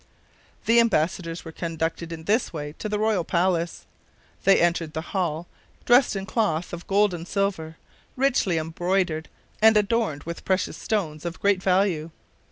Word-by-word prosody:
The 230 +1 +5
embassadors 170 -6 0
were 160 - -7
conducted 165 0 -3
in 160 -1 -7
this 215 +8 +1
way 150 -2 -5
to 215 - -4
the 210 - 0
royal 215 -4 +1
palace. 170 0 0 0.6
They 195 - +6
entered 170 -2 +1
the 160 +1 -5
hall, 170 -4 -1 0.4
dressed 245 -2 +5
in 195 0 -3
cloth 180 -7 -1
of 175 0 -7
gold 200 0 +3
and 170 0 -6
silver, 185 -6 -2 0.4
richly 250 -10 +2
embroidered, 165 0 -1 0.3
and 220 0 +7
adorned 210 -8 0
with 170 +1 -7
precious 190 -1 0
stones 160 -9 -2
of 170 0 -5
great 200 -2 +2
value. 185 -4 +1
175 Hz, 155 wpm, -25 LUFS, 165-205 Hz, 0.6 s, and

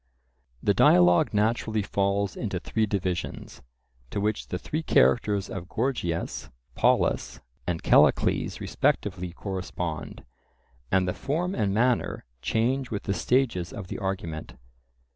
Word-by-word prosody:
The - - +3
dialogue 90 -1 +5
naturally 110 0 +1
falls 100 0 0
into - - -3
three 110 -1 -1
divisions, 95 -3 -3 0.5
to - - -3
which 105 +1 -1
the 90 - -3
three 155 - -3
characters 105 -9 +3
of 90 -1 -7
Gorgias, 90 - -2 0.2
Polus, - - +1 0.3
and 85 -2 -2
Callicles - - +3
respectively 90 -3 -1
correspond; 90 -3 -5 0.7
and 95 -1 +3
the 90 - 0
form 165 - -2
and 105 - 0
manner 120 - +1 0.2
change 120 - 0
with 105 -3 -4
the 100 - -1
stages 115 -8 +1
of 100 -3 -8
the - - -5
argument. 85 -9 -4
100 Hz, 125 wpm, -27 LUFS, 90-110 Hz, 0.7 s, dialogue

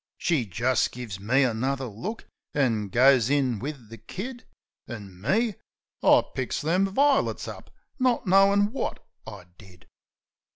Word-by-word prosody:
She 155 -10 0
just 120 +6 0
gives 115 -6 -7
me 130 +8 +2
another 130 +3 -1
look, 130 - -6 0.3
an' 115 -8 +1
goes 130 +2 +4
in 135 -6 +1
wiv 135 -4 -7
the 115 -1 -11
kid. 240 - -8 0.4
An' 100 -6 -9
me? 215 - +1 0.5
I - - +5
picks 130 -1 -2
them 180 +6 +1
vi'lits 275 +8 +1
up, - - -9 0.3
not 255 -2 +1
knowin' 200 +2 +4
wot 270 - -3 0.3
I 100 -5 -9
did. 90 -4 -17
130 Hz, 135 wpm, -26 LUFS, -, 0.5 s, I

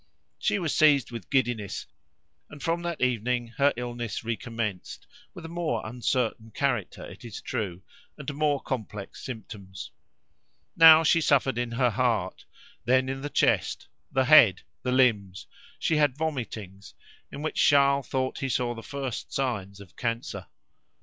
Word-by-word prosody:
She - - +1
was 170 -6 -1
seized 145 -6 +4
with 115 -6 -8
giddiness, 120 -7 -1 0.6
and 150 - -11
from 170 +1 0
that 170 -2 -4
evening 120 -1 0
her 140 +1 +4
illness 120 -3 -4
recommenced, 115 -4 -4 0.3
with 170 - -9
a - - -5
more 165 -9 -2
uncertain 120 -1 -2
character, 120 -9 -1
it - - -12
is 115 -4 -7
true, 95 -3 -4 0.3
and 145 -1 -5
more 145 -1 +1
complex 105 -7 -6
symptoms. 105 -6 -8 0.8
Now 160 0 +9
she 165 +1 +4
suffered 135 -4 +2
in 120 -1 -3
her 125 0 +2
heart, 110 -5 -1 0.4
then 130 +2 +2
in 135 0 -4
the 145 - -4
chest, - - +1 0.2
the 130 0 +2
head, 120 -10 +7 0.2
the 125 - -2
limbs; 105 -8 +2 0.3
she 160 - +1
had 145 -3 +2
vomitings, 110 - -5 0.4
in 145 - -7
which 155 - 0
Charles 140 -2 +4
thought 130 -1 -2
he 135 - -2
saw 120 -1 0
the 115 - -8
first 135 -1 -5
signs 100 -7 -3
of 100 -4 -14
cancer. 115 0 -4
125 Hz, 150 wpm, -27 LUFS, 110-140 Hz, 0.8 s, Now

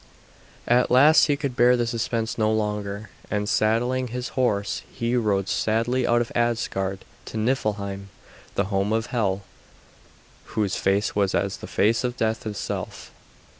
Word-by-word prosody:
At 125 +1 +3
last 145 +6 +6
he 145 -2 +1
could 140 -4 -3
bear 125 +1 +5
the 120 - +1
suspense 115 -1 -2
no 110 -1 +1
longer, 105 -1 -2 0.2
and 105 0 -1
saddling 120 +5 +1
his 125 +1 -4
horse 110 -5 0
he 115 +1 -1
rode 100 -5 +1
sadly 115 +3 +1
out 120 0 +3
of 120 - -4
Asgard 100 -5 -1 0.2
to - - -6
Niflheim, 100 -4 -1 0.5
the 100 - +2
home 100 +2 +1
of 110 0 0
Hel, 100 -4 0 1.1
whose 105 -3 +1
face 100 +2 +1
was 100 -2 +1
as - - 0
the - - -9
face 110 +4 +2
of 125 0 -2
death 110 0 -1
itself. 105 -1 -5
110 Hz, 150 wpm, -24 LUFS, 105-120 Hz, 1.1 s, last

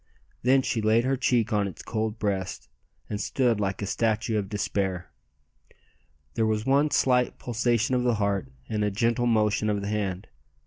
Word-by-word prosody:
Then 130 +2 +4
she 115 - -1
laid 110 +2 +3
her 135 +2 +1
cheek 120 -3 +1
on 105 -1 +2
its 95 - -9
cold 110 -1 -2
breast, 100 -3 -3 0.4
and 105 0 -3
stood 120 -5 +1
like 100 0 -2
a - - -1
statue 110 +1 0
of 100 -2 -5
despair. 95 -3 -2 1.2
There 110 -1 +1
was 110 0 0
one 140 +3 +3
slight 125 -3 +2
pulsation 120 +1 0
of 125 - +2
the 120 -1 +2
heart 100 -10 -1 0.2
and 105 -1 -1
a 105 - +2
gentle 115 +4 +1
motion 110 -2 +2
of 105 -1 0
the 100 - -4
hand! 100 -3 -2
110 Hz, 175 wpm, -26 LUFS, 100-120 Hz, 1.2 s, Then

